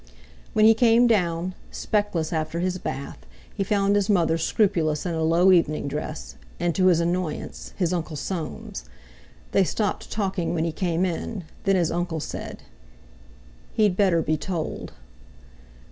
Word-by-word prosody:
When 215 - +5
he 225 - +8
came 230 +1 +5
down, 180 -5 +1 0.2
speckless 195 -7 -1
after 160 +1 -2
his 185 +1 -1
bath, 140 - -5 0.3
he 195 - -1
found 200 0 +2
his 205 0 +1
mother 170 -5 +3
scrupulous 165 -3 +1
in 175 - -1
a 160 - -1
low 170 +4 +4
evening 155 -5 +2
dress, 150 +2 -5 0.2
and, 175 -1 +1
to 185 +1 +3
his 175 -3 +5
annoyance, 170 -1 -2
his 180 -2 +1
Uncle 170 -3 -3
Soames. 155 - -5 0.7
They 195 - +4
stopped 205 +2 -2
talking 190 -5 -1
when 160 0 0
he 165 - -1
came 175 +1 0
in; 185 +3 -3 0.2
then 195 0 +4
his 170 -3 +2
uncle 175 -1 -2
said: - - -6 1.1
"He'd 210 -4 +3
better 185 -5 +3
be 155 +1 +1
told." 165 +1 -4
175 Hz, 150 wpm, -25 LUFS, 165-195 Hz, 1.1 s, he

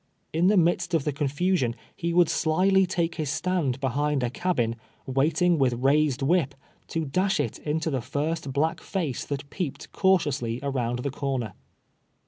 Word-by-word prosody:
In 165 +3 +3
the 205 +1 +4
midst 175 0 +2
of 155 - +1
the 150 - 0
confusion 145 -2 0 0.2
he 170 0 -2
would 175 0 +5
slily 185 +5 +3
take 170 -2 -1
his 155 -4 -2
stand 155 -4 0
behind 140 +1 0
a 120 - -1
cabin, 125 -9 0 0.3
waiting 155 +6 +2
with 130 -3 +3
rais 140 +3 +3
ed 140 - -5
whip, 150 -2 +2 0.3
to 160 -1 -2
dash 190 +7 +1
it - - -2
into 160 +1 -1
the 130 -3 -1
first 150 +3 -2
black 155 +4 0
face 165 -10 -3
that 140 -1 -4
peep 175 -8 -3
ed - - -12
cautiously 145 - +1
around 125 -3 -1
the 140 - -1
corner. 135 -4 -3
150 Hz, 170 wpm, -26 LUFS, 135-175 Hz, 0.3 s, would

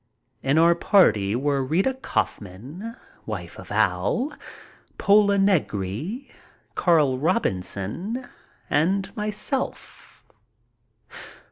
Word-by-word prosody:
In 135 +3 +1
our 170 +1 +6
party 110 - +3
were 140 +1 0
Rita 180 - +1
Kaufman, 155 - -4 0.3
wife - - -6
of - - -11
Al, 275 +5 +1 0.6
Pola 200 0 +4
Negri, 185 - 0 0.5
Carl 150 -7 +3
Robinson, 160 - -2 0.4
and 190 +6 +1
myself. 210 +5 -4
170 Hz, 80 wpm, -24 LUFS, 130-210 Hz, 0.6 s, our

